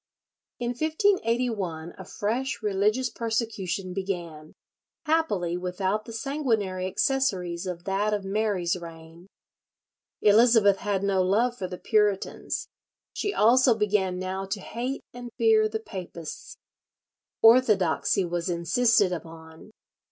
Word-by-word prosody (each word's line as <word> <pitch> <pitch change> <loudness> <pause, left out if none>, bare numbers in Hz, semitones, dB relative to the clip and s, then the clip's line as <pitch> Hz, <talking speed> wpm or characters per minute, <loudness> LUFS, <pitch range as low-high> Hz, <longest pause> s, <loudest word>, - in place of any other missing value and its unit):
In 240 -1 -3
1581 240 - 0
a 190 - -9
fresh 235 +6 -3
religious 210 +5 +1
persecution 215 -5 -3
began, 175 -5 -5 0.5
happily 210 - 0
without 190 +4 -2
the - - -9
sanguinary 225 -7 -1
accessories 190 -6 0
of 175 -1 -5
that 200 +3 0
of 205 -2 -2
Mary's 195 -3 0
reign. 165 0 -11 1.0
Elizabeth 215 -1 +5
had 200 -1 -2
no 195 -1 +2
love 220 +7 +2
for 190 -6 -4
the 180 0 -7
Puritans; 210 -2 0 0.5
she 410 - -2
also 250 - +4
began 200 -3 +1
now 185 +1 -3
to 195 +2 -4
hate 245 +7 -4
and 245 0 -8
fear 435 -1 +4
the 440 - -3
papists. 205 - -8 0.9
Orthodoxy 210 -6 +4
was 175 +1 -3
insisted 200 +4 +2
upon. 160 +1 -10
205 Hz, 115 wpm, -26 LUFS, 180-240 Hz, 1.0 s, Elizabeth